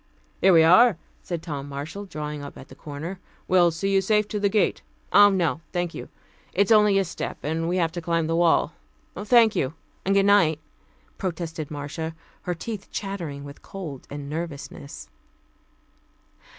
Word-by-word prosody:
"Here 190 Hz, -, +6 dB
we 165 Hz, -2 st, +7 dB
are," 185 Hz, +5 st, +6 dB, 0.2 s
said 170 Hz, -3 st, -5 dB
Tom 145 Hz, -4 st, -5 dB
Marshall, 155 Hz, +8 st, -6 dB
drawing 150 Hz, -4 st, -5 dB
up 140 Hz, -, -9 dB
at 130 Hz, -, -12 dB
the -, -, -12 dB
corner. 160 Hz, +6 st, -7 dB, 0.3 s
"We'll 180 Hz, -2 st, +5 dB
see 195 Hz, +4 st, -2 dB
you 195 Hz, -, +4 dB
safe 210 Hz, +2 st, +2 dB
to 210 Hz, -, -2 dB
the 200 Hz, 0 st, +2 dB
gate 205 Hz, 0 st, +1 dB, 0.2 s
" -, -, -22 dB
"Oh, 205 Hz, 0 st, +8 dB
no, 175 Hz, -5 st, 0 dB
thank 175 Hz, -2 st, -1 dB
you. -, -, -8 dB, 0.4 s
It 200 Hz, -, +4 dB
is 200 Hz, -, -3 dB
only 210 Hz, -2 st, +6 dB
a 195 Hz, -, +2 dB
step, 175 Hz, -, -5 dB
and 160 Hz, +2 st, -1 dB
we 180 Hz, -, 0 dB
have 165 Hz, -2 st, +1 dB
to 175 Hz, +1 st, -5 dB
climb 165 Hz, -1 st, 0 dB
the 165 Hz, +1 st, 0 dB
wall. 170 Hz, -1 st, +3 dB, 0.4 s
Thank 220 Hz, +3 st, +4 dB
you, 135 Hz, +4 st, -1 dB, 0.3 s
and 195 Hz, +1 st, +1 dB
goodnight," 195 Hz, -6 st, +4 dB, 0.6 s
protested 165 Hz, -4 st, -4 dB
Marcia, 155 Hz, +2 st, -5 dB, 0.3 s
her 180 Hz, -, -3 dB
teeth 205 Hz, +4 st, -6 dB
chattering 175 Hz, -9 st, -5 dB
with 140 Hz, 0 st, -11 dB
cold 160 Hz, -9 st, -8 dB
and 145 Hz, 0 st, -6 dB
nervousness. 145 Hz, -2 st, -6 dB
170 Hz, 175 wpm, -25 LUFS, 155-195 Hz, 0.6 s, Oh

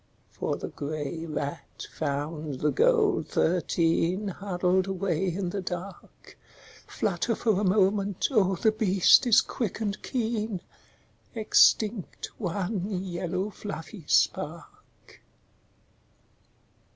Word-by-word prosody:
For -, -, -2 dB
the -, -, -6 dB
grey 155 Hz, +2 st, -5 dB
rat 150 Hz, 0 st, -5 dB
found 150 Hz, -1 st, -3 dB
the 150 Hz, -, +2 dB
gold 455 Hz, -5 st, +2 dB
thirteen 175 Hz, +3 st, +1 dB
Huddled 185 Hz, -1 st, 0 dB
away 190 Hz, -1 st, -1 dB
in 180 Hz, 0 st, -3 dB
the 200 Hz, -, -3 dB
dark, 180 Hz, +1 st, -8 dB, 0.5 s
Flutter 200 Hz, +4 st, -1 dB
for 210 Hz, -4 st, +1 dB
a -, -, -1 dB
moment, 195 Hz, 0 st, +2 dB
oh 195 Hz, -6 st, +3 dB
the 220 Hz, +5 st, +2 dB
beast 205 Hz, +2 st, +4 dB
is 230 Hz, -, +6 dB
quick 225 Hz, -6 st, -4 dB
and 210 Hz, -2 st, -3 dB
keen, 220 Hz, -6 st, -2 dB, 0.7 s
Extinct 215 Hz, -2 st, +2 dB
one 190 Hz, 0 st, -2 dB
yellow 185 Hz, +2 st, -3 dB
fluffy 200 Hz, -3 st, -8 dB
spark. -, -, -2 dB
190 Hz, 105 wpm, -27 LUFS, 170-210 Hz, 0.7 s, is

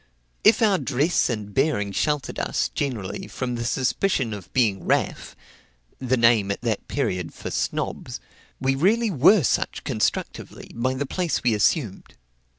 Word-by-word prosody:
If 225 Hz, +2 st, +5 dB
our 200 Hz, -4 st, +3 dB
dress 140 Hz, +6 st, +1 dB
and 105 Hz, -3 st, -4 dB
bearing 135 Hz, -8 st, +1 dB
sheltered 150 Hz, +7 st, -1 dB
us, -, -, -1 dB
generally, 115 Hz, -9 st, -4 dB
from 125 Hz, -2 st, -4 dB
the 115 Hz, -1 st, -3 dB
suspicion 130 Hz, -, 0 dB
of 95 Hz, -3 st, -9 dB
being 110 Hz, -7 st, +1 dB
"raff," -, -, -1 dB, 0.6 s
(the 130 Hz, 0 st, 0 dB
name 115 Hz, -4 st, +4 dB
at 100 Hz, -, -2 dB
that 115 Hz, -3 st, -2 dB
period 90 Hz, -3 st, -2 dB
for -, -, -6 dB
"snobs,") -, -, -3 dB, 0.4 s
we 135 Hz, 0 st, +1 dB
really 210 Hz, +10 st, +2 dB
were 170 Hz, +5 st, +5 dB
such -, -, 0 dB
constructively, -, -, -3 dB
by 130 Hz, +3 st, -1 dB
the 140 Hz, +2 st, -2 dB
place 175 Hz, +4 st, -2 dB
we 120 Hz, -2 st, +3 dB
assumed. 105 Hz, -, 0 dB
130 Hz, 150 wpm, -24 LUFS, 110-150 Hz, 0.6 s, If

